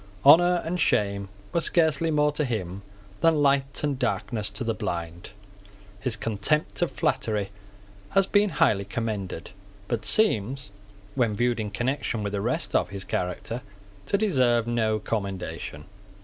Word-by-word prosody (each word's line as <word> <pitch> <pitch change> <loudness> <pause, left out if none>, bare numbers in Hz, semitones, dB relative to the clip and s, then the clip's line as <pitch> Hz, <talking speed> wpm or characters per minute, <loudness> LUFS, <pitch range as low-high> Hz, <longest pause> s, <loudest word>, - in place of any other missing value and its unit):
Honour 175 +4 +7
and 175 +2 -2
shame 100 - +1 0.2
were 170 - +2
scarcely 160 -1 +2
more 150 -1 +3
to 150 +1 -1
him 100 -7 -3 0.4
than 160 -3 +3
light 140 0 +2
and 145 -3 0
darkness 115 -4 -1
to - - -2
the 115 -1 0
blind. 85 -3 -4 0.7
His 115 +1 0
contempt 115 - -1
of 175 - +2
flattery 105 -6 -1 0.6
has 195 - +3
been 205 +1 +3
highly 100 - +2
commended, 100 -5 -4 0.4
but 115 -3 -2
seems, 130 - +1 0.4
when 115 -5 +1
viewed 120 +1 +1
in 105 -1 -2
connection 120 0 -2
with 100 0 -3
the 100 - -1
rest - - -2
of - - +2
his 100 0 -6
character, 90 +7 -3 0.5
to 200 - +2
deserve 130 - +2
no 115 -2 +1
commendation. 95 -8 -4
120 Hz, 145 wpm, -26 LUFS, 100-150 Hz, 0.7 s, Honour